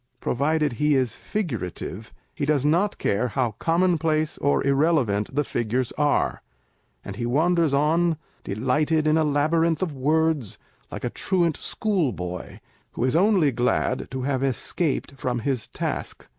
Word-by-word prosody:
Provided 150 +2 0
he 150 +5 +2
is 130 -4 +1
figurative, 115 - -4 0.2
he 145 - -5
does 145 -1 +1
not 175 +7 +2
care 105 +5 0
how 120 0 0
commonplace 165 -3 +1
or 145 - +1
irrelevant 135 -7 +1
the 145 - +2
figures 120 0 -1
are, 145 -1 +1 0.6
and 100 0 -7
he 120 - -2
wanders 165 +4 +2
on, 160 +4 +2 0.3
delighted 150 +9 0
in 155 0 +3
a 160 - +3
labyrinth 155 +3 +2
of 165 -5 -3
words, 150 -3 +1 0.3
like - - -6
a - - -2
truant 175 -5 0
schoolboy, 125 - -2 0.4
who - - -2
is 130 +3 +1
only 185 -5 +4
glad 125 0 0
to 130 -1 -4
have 135 -1 0
escaped 135 +3 -1
from 125 -2 -1
his 125 -1 -2
task. - - -4
145 Hz, 145 wpm, -24 LUFS, 125-160 Hz, 0.6 s, only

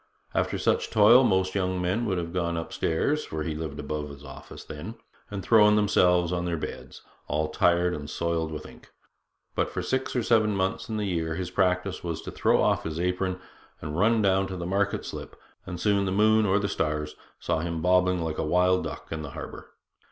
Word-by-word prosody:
After - - 0
such - - +1
toil 115 +4 +7
most 95 -4 +2
young 95 -2 -1
men 95 +7 0
would 95 -3 0
have 85 -1 -4
gone 85 -2 -1
upstairs 80 - -1
(for 80 0 -4
he 80 - -3
lived 75 -2 -5
above 75 0 -4
his 70 0 -11
office 70 -1 -10
then) 80 +10 -8 0.3
and 100 -2 -5
thrown 105 0 +6
themselves 90 -4 +3
on 90 -1 -1
their 85 -1 -1
beds, - - -7 0.2
all 75 +1 -1
tired 90 +2 +2
and 75 -2 -6
soiled 85 0 -1
with 75 -1 -6
ink; - - -14 0.6
but - - 0
for - - -4
six 130 0 -2
or 125 - +1
seven 110 -3 +3
months 95 +5 -1
in 110 - -2
the 105 - -1
year 80 -4 -1
his 90 0 -4
practice 90 0 0
was 85 -2 -3
to - - -6
throw - - +2
off - - +2
his 80 0 -4
apron 90 +1 -1 0.4
and 75 0 -5
run 110 +2 +3
down 95 0 +2
to 95 - -6
the 85 - -4
market 100 +2 0
slip, - - -7 0.3
and 90 -1 -5
soon 100 -1 +2
the 95 - -1
moon 110 +2 +4
or 95 +1 +3
the 100 -1 0
stars 75 -5 -2 0.2
saw - - -1
him 85 0 -3
bobbing 90 -1 +3
like 80 -1 -3
a - - 0
wild 90 +3 +2
duck - - -7
in 80 -1 -3
the 75 - -6
harbour. - - -8
90 Hz, 210 wpm, -27 LUFS, 80-100 Hz, 0.6 s, toil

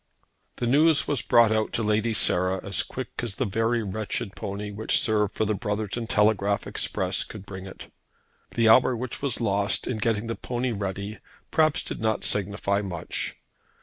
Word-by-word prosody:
The 120 - -3
news 150 +5 +4
was 140 -5 0
brought 115 -2 +4
out 110 0 0
to 115 - -1
Lady 110 +1 +1
Sarah 95 -1 +3
as 100 -1 +2
quick 130 -1 -6
as 115 -5 -2
the 130 - -1
very 115 +3 0
wretched 105 0 -4
pony 100 +1 -5
which 105 +2 +2
served 105 -3 +1
for 110 - 0
the 105 - 0
Brotherton 105 +2 -3
telegraph 105 -3 +2
express - - 0
could 105 -2 -10
bring 95 -1 -8
it. 95 - -12 0.6
The 115 -1 +3
hour 125 +3 +6
which 125 +1 -5
was 140 -4 0
lost 100 -2 +1
in 125 - -2
getting 110 0 0
the 115 0 -3
pony 125 0 -3
ready, 100 0 -4 0.3
perhaps, 155 -2 +2
did - - -6
not 110 -1 0
signify 100 0 0
much. 90 -5 -4
110 Hz, 175 wpm, -26 LUFS, 100-120 Hz, 0.6 s, hour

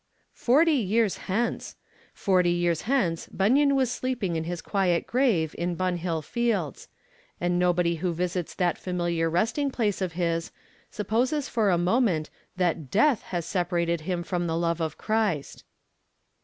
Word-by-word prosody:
Forty 300 +7 +3
years 220 -4 +1
hence! 230 +6 -1 0.4
Forty 185 -3 +2
years 175 -2 +1
hence 185 -12 +1
Bunyan 275 +8 +3
was 260 -3 +2
sleeping 245 -9 -2
in 160 0 -2
his 175 0 -4
quiet 185 -3 0
grave 220 - +1
in 175 0 -1
Bunhill 175 -3 -1
Fields; 220 - -2 0.5
and 175 0 0
nobody 175 -1 +2
who 180 +2 -1
visits 175 0 -3
that 175 -2 0
familiar 175 -2 -1
resting 225 - 0
place 215 -7 -1
of 185 -3 -2
his 165 -1 -1 0.4
supposes 245 +8 0
for 220 -4 +1
a 175 - +3
moment 175 - +1 0.3
that 170 -6 0
death 245 - +3
has 175 -3 -3
separated 170 -2 0
him 175 +1 -2
from 175 -1 -2
the 165 0 -1
love 170 0 0
of 160 -2 -2
Christ. 215 -10 -1
180 Hz, 145 wpm, -26 LUFS, 170-225 Hz, 0.5 s, Forty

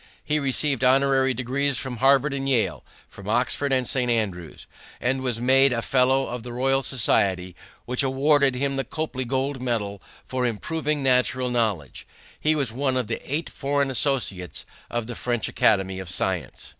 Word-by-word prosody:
He 150 0 0
received 135 -1 0
honorary 135 0 +4
degrees 130 +2 0
from 130 -2 -4
Harvard 135 +3 +3
and 135 0 -2
Yale, 120 -5 +1 0.2
from - - -10
Oxford 140 -1 +1
and 130 -1 +2
St. 125 -2 0
Andrews, 95 -8 -2 0.3
and 130 +2 0
was 125 -3 -1
made 135 +2 +4
a 115 -1 -1
fellow 135 +1 +2
of 125 0 -5
the 120 +1 -8
Royal 135 +2 +1
Society, 95 -8 0 0.3
which 125 +1 +1
awarded 140 0 +3
him 135 +1 -1
the 135 - 0
Copley 135 -1 -4
gold 135 +2 -2
medal 105 -5 -2 0.2
for 130 -1 -2
improving 150 +5 -2
natural 125 -1 +2
knowledge. 105 - -2 0.3
He 155 +1 +2
was 140 -6 0
one 130 +2 0
of 125 - 0
the - - -4
eight 155 +3 -1
foreign 140 -1 -1
associates 120 - -1 0.2
of 120 -1 -2
the 120 - -6
French 120 -2 -2
Academy 95 -3 +1
of 95 -2 -7
Science. - - -3
130 Hz, 170 wpm, -24 LUFS, 120-135 Hz, 0.3 s, honorary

